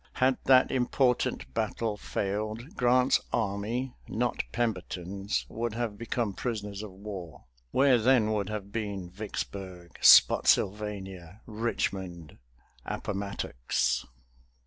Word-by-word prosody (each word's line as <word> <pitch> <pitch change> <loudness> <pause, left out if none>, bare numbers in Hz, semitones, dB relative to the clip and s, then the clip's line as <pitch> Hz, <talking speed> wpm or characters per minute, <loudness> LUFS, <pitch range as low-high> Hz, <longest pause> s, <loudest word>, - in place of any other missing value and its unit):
Had 130 0 +2
that 130 -1 +6
important 125 - +1
battle 110 - -1
failed, 105 +6 -3
Grant's 125 +1 +4
army, 115 +4 -1
not 120 +1 -1
Pemberton's, 100 -3 -2
would 115 -1 -3
have 115 -3 -2
become 115 -1 -2
prisoners 105 -3 -4
of 110 - -7
war. 95 -3 -8 0.3
Where 130 - +4
then 115 -2 +4
would 105 -2 -1
have 105 -2 -5
been 100 -5 -4
Vicksburg, 95 -3 -6
Spotsylvania, 95 -2 +4
Richmond, 95 - -3 0.4
Appomattox? 65 -11 -2
105 Hz, 100 wpm, -29 LUFS, 95-120 Hz, 0.4 s, that